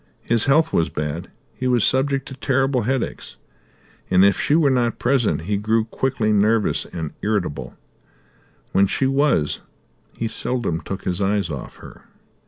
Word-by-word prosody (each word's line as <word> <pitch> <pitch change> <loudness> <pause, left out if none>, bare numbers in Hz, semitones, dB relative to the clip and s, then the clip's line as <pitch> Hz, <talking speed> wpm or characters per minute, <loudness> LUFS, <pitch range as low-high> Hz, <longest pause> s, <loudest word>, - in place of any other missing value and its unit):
His 115 -2 +2
health 160 +3 +3
was 80 - +2
bad, 75 +3 -4 0.2
he 130 - -3
was 125 -4 +3
subject 135 +1 +1
to - - -8
terrible 135 -1 +1
headaches, 130 0 -3 0.7
and 95 +1 +5
if 100 - +3
she 145 - +2
were 155 -4 +4
not 120 -3 +1
present 125 -8 +1
he 100 +5 -1
grew 110 +2 +1
quickly 115 -2 -1
nervous 105 +1 +2
and 80 -3 -6
irritable; 100 -8 -2 0.9
when 100 +1 +4
she 135 - 0
was, 135 - +1 0.6
he 115 - -1
seldom 115 -8 -2
took 95 - -6
his 90 +1 -2
eyes 100 -3 0
off 70 -4 -7
her. - - -14
115 Hz, 155 wpm, -21 LUFS, 95-135 Hz, 0.9 s, and